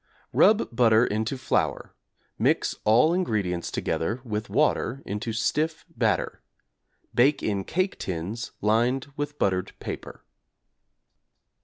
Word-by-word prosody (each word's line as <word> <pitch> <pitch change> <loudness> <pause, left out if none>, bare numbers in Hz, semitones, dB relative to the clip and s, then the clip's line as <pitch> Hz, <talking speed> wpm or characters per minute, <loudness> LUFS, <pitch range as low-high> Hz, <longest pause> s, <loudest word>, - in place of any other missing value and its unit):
Rub 215 - +4
butter 115 -1 +5
into 110 +5 -2
flour, 130 - -1 0.5
mix - - +2
all 125 +10 +5
ingredients 100 - -1
together 110 +9 -2
with 110 -1 -4
water 140 -3 +1
into 105 +3 -3
stiff 155 +8 -1
batter; 110 -6 0 0.7
bake 135 +5 +3
in 100 -2 -1
cake 185 - -1
tins 95 +7 -4
lined 120 +6 +1
with 145 0 -4
buttered 95 -2 0
paper. - - -7
115 Hz, 110 wpm, -26 LUFS, 105-140 Hz, 0.7 s, butter